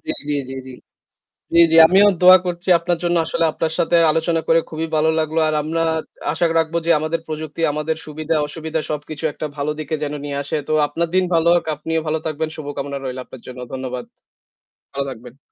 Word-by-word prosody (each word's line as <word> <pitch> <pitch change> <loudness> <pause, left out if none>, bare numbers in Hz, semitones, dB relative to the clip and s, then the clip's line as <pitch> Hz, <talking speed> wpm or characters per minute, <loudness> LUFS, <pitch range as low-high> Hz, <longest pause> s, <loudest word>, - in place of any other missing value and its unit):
জি, - - -4 0.4
জি, - - -5
জি। 130 - -9 0.8
জি, - - +5
জি - - +5
আমিও 195 +4 +5
দোয়া 185 +1 +9
করছি 175 +1 -4
আপনার 175 0 -1
জন্য 175 0 +1
আসলে 165 - 0
আপনার 160 0 -2
সাথে 170 - +2
আলোচনা 165 +1 +1
করে 165 - +5
খুবই 160 +1 -3
ভালো 155 +1 +3
লাগলো। 160 0 -1
আর 155 - 0
আমরা 165 +2 -1 0.5
আশা 170 +2 +1
রাখবো 165 +1 0
যে - - +2
আমাদের 155 +2 -2
প্রযুক্তি 155 0 -6
আমাদের 150 +2 -2
সুবিধা-অসুবিধা 155 +1 -2
সবকিছু 150 +1 -5
একটা 155 - -5
ভালো 145 +1 -1
দিকে 155 0 -3
যেন 145 -1 -2
নিয়ে 145 -1 -4
আসে। 140 - -2
তো - - -1
আপনার 165 +3 -2
দিন 185 0 +4
ভালো 165 0 +3
হোক। 175 - +1
আপনিও 160 +2 -2
ভালো 155 +1 0
থাকবেন। 160 0 -2
শুভকামনা 145 -2 -5
রইলো 130 -1 -5
আপনার 130 -2 -13
জন্য। 125 0 -9
ধন্যবাদ। 130 -1 -5 0.9
ভালো 140 0 -2
থাকবেন। 125 +1 -11
155 Hz, 190 wpm, -20 LUFS, 145-165 Hz, 0.9 s, দোয়া